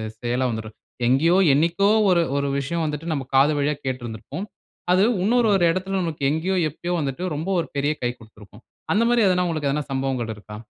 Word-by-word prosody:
செ - - -41
செயலா 125 +2 0
வந்துரும். 110 -1 -6 0.3
எங்கேயோ, 160 +9 +3 0.2
என்னைக்கோ, 170 +7 +2 0.2
ஒரு 175 -2 +4 0.2
ஒரு 140 0 0
விஷயம் 165 +5 -2
வந்துட்டு 150 +2 -4
நம்ம 140 -3 -2
காது 140 +3 +5
வழியா 145 +1 0
கேட்டுருந்திருப்போம். 130 - -5 0.5
அது 185 +2 +4 0.2
இன்னொரு 235 +2 +3
ஒரு 180 -3 +3
இடத்துல 185 +2 -3
நமக்கு 160 -4 -4
எங்கேயோ, 165 +5 -1
எப்பயோ 175 +4 -5
வந்துட்டு 140 +4 -3
ரொம்ப 160 +6 -4
ஒரு - - -2
பெரிய 145 +2 +1
கை 120 - +1
குடுத்திருக்கும். 110 -2 -17 0.3
அந்த 220 - +3
மாரி 240 -1 +3
எதுனா 180 -1 +2
உங்களுக்கு 155 -4 -1
எதுனா 150 +1 -1
சம்பவங்கள் 130 -4 -2
இருக்கா? 105 +1 -11
150 Hz, 185 wpm, -23 LUFS, 130-175 Hz, 0.5 s, காது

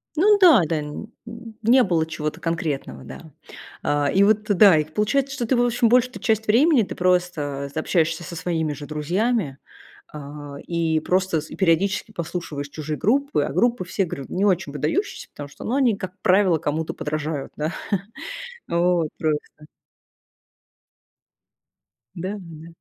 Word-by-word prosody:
Ну 410 +6 +5
да, 345 - +7
да, 155 -1 -1 0.8
не 250 +3 +5
было 170 -5 +1
чего-то 155 0 -4
конкретного, 150 - -3
да, - - -11 0.5
а. 145 -1 +1
И 195 - +4
вот 210 +1 +3
да, 200 -4 +6
и 155 - +2
получается, 255 - 0
что 240 - -2
ты, 260 - +1
в 240 - +3
общем, 240 -1 +2
большую-то 250 +1 +2
часть 220 -1 0
времени 260 +3 +5
ты - - -6
просто, 175 -6 0
э, - - 0
общаешься 165 0 0
со 170 +1 -7
своими 160 -3 -1
же 145 - -8
друзьями, 155 - -1 0.6
э, - - -7 0.5
и 165 -2 +1
просто 185 -2 +1
с 155 - -12
и - - -7
периодически 190 +4 +1
послушиваешь 165 -5 -5
чужие 155 0 -5
группы. 280 - +1
А - - -4
группы, 240 -4 +2
все 190 +2 -1
говорю, 140 -5 -6
не 195 +3 0
очень 185 -6 +1
выдающиеся, 165 - -2
потому 145 -1 -9
что, 140 - -12
ну, 245 - -1
они, 255 -6 +3
как 185 -1 -6
правило, 190 -3 +4
кому-то 155 +1 -2
подражают. 150 -1 -4
Да, 155 +3 -2 1.0
вот, 170 -1 +2
просто. 155 -2 +1 2.8
Да 185 +4 -4
да. 165 -3 -11
175 Hz, 155 wpm, -23 LUFS, 155-215 Hz, 2.8 s, да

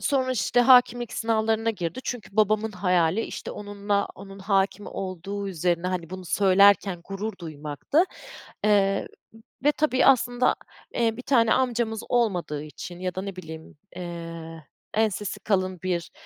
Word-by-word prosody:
sonra, 260 -2 +1
işte, 245 0 +2
hâkimlik 245 -1 +5
sınavlarına 225 0 +1
girdi. 175 +2 -4
Çünkü 220 -4 -6
babamın 215 +1 +2
hayali, 180 0 +2
işte, - - -6
onunla, 205 0 -2
onun 195 0 -11
hâkim 195 +1 0
olduğu 195 +2 -5
üzerine, 175 0 0
hani, 175 -3 -3
bunu 185 0 -7
söylerken 195 -1 +4
gurur 200 +3 -4
duymaktı. 155 - 0 0.6
Eee, 195 -2 +3 0.6
ve 295 - +5
tabii, 295 -4 +2
aslında, 250 -2 +4 0.4
eee, 225 -1 +1
bir - - -5
tane 230 -5 +4
amcamız 235 -4 0
olmadığı 180 -11 0
için 175 +3 -9
ya 185 0 -3
da 185 - -2
ne 195 -1 -6
bileyim, 160 -4 -10 0.2
eee, 165 -2 -7 0.3
ensesi 210 -1 0
kalın 185 -3 0
bir, 175 -3 -2
200 Hz, 135 wpm, -25 LUFS, 180-225 Hz, 0.6 s, hâkimlik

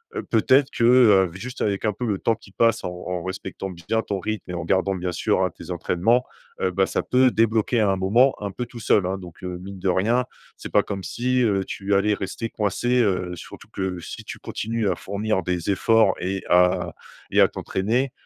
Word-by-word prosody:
heu, 410 - -2
peut-être 130 +4 +3
que, 115 - -2
heu, 105 -8 +6
juste 125 +7 -7
avec 100 0 0
un 105 - +1
peu 125 - -4
le 100 -4 -1
temps 115 - +1
qui 105 -2 -18
passe 115 +3 +2
en - - -2
en 90 -1 -5
respectant 95 +1 -5
bien 90 +6 -2
ton 100 -2 -3
rythme 110 -2 -4
et - - -5
en 85 -2 -4
gardant 95 +2 +1
bien 90 0 -3
sûr 95 +2 +1
hein, 90 - +1
tes 85 - -8
entraînements, 100 +8 +1 0.4
heu, 95 - +2
bah 95 +1 +2
ça - - -1
peut 130 0 +3
débloquer 115 +1 +2
à 105 - +3
un 95 - +1
moment 115 +8 +3
un 100 -1 -3
peu 120 +6 -4
tout 120 0 -10
seul 105 -3 +3
hein 95 - -2
donc, 90 -3 -12
heu, 90 -1 -4
mine 95 +1 -9
de 95 +1 0
rien 115 +8 +2 0.3
c'est - - -8
pas - - +4
comme 95 -1 -5
si, 125 +8 0
heu, 100 -4 +2
tu 100 +1 -2
allais 105 +2 +3
rester 100 +4 -4
coincé, 120 +4 0
heu, 90 -3 -1
surtout - - -12
que 95 -2 -3
si - - -8
tu - - -7
continues 115 -1 -3
à - - 0
fournir 100 0 -2
des 90 +2 -1
efforts 110 0 +4
et 95 +1 -2
à 90 +1 +3 0.4
et - - +4
à - - +7
t'entraîner, 120 +7 -1
100 Hz, 225 wpm, -23 LUFS, 95-115 Hz, 0.4 s, à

